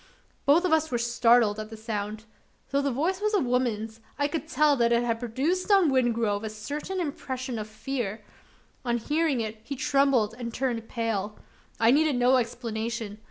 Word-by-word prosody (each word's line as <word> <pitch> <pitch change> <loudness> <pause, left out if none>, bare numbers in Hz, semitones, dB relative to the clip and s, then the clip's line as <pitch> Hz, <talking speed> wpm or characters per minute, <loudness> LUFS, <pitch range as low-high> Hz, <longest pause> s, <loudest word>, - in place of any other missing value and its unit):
Both 320 +6 +5
of 345 - +2
us 315 0 +2
were 245 - 0
startled 235 -2 +3
at 215 0 -6
the 220 - -9
sound. 215 0 -4 0.5
Though 280 0 +2
the 280 - 0
voice 335 +10 -1
was 425 0 +1
a - - +4
woman's, 235 - -1 0.2
I 285 - +1
could 315 +1 -4
see - - -8 0.2
that 235 -2 +2
it 235 0 +3
had 230 -1 -1
produced 280 - -1
on 385 -7 +5
Wingrove 230 -5 +1
a 220 - -3
certain 290 - -5
impression 260 -6 -4
of 215 - -5
fear. 215 -1 -4 0.6
On 240 -1 0
hearing 295 +1 0
it, 220 0 -5
he 280 +5 -5
trembled 270 -5 +2
and 235 -1 -4
turned 235 -2 -2
pale. 215 -3 -2 0.4
I 225 +1 +5
needed 300 +1 +3
no 250 +1 +4
explanation. 225 -2 -3
240 Hz, 180 wpm, -27 LUFS, 220-280 Hz, 0.6 s, Both